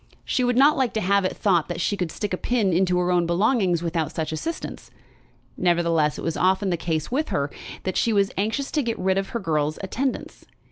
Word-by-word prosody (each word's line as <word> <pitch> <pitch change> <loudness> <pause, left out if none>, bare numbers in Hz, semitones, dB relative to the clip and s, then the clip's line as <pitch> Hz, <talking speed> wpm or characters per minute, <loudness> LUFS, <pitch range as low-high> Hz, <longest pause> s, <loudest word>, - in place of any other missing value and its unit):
She 255 - 0
would 245 0 +1
not 285 +3 +5
like 260 -3 +1
to - - +2
have 200 -1 +2
it - - -2
thought 175 -6 +2
that 175 -1 -4
she 205 - 0
could 180 -5 -3
stick 205 +1 -4
a - - 0
pin 215 -6 +1
into 180 +1 +2
her 180 0 +1
own 175 -1 +2
belongings 185 -1 +2
without 165 -2 -1
such 160 -1 -3
assistance. 320 - -5 0.7
Nevertheless 170 -4 +2
it - - -6
was 165 - -1
often 190 +1 +2
the - - +2
case 160 0 -2
with 300 +5 0
her, 145 -7 -1 0.3
that 185 - -2
she 230 - +2
was 200 -2 +2
anxious 220 +8 -1
to 300 - +1
get 235 -3 -2
rid 190 +1 +1
of 195 - -4
her 235 - -3
girl's 155 -5 -1
attendance. 255 +7 -3
185 Hz, 225 wpm, -24 LUFS, 170-220 Hz, 0.7 s, not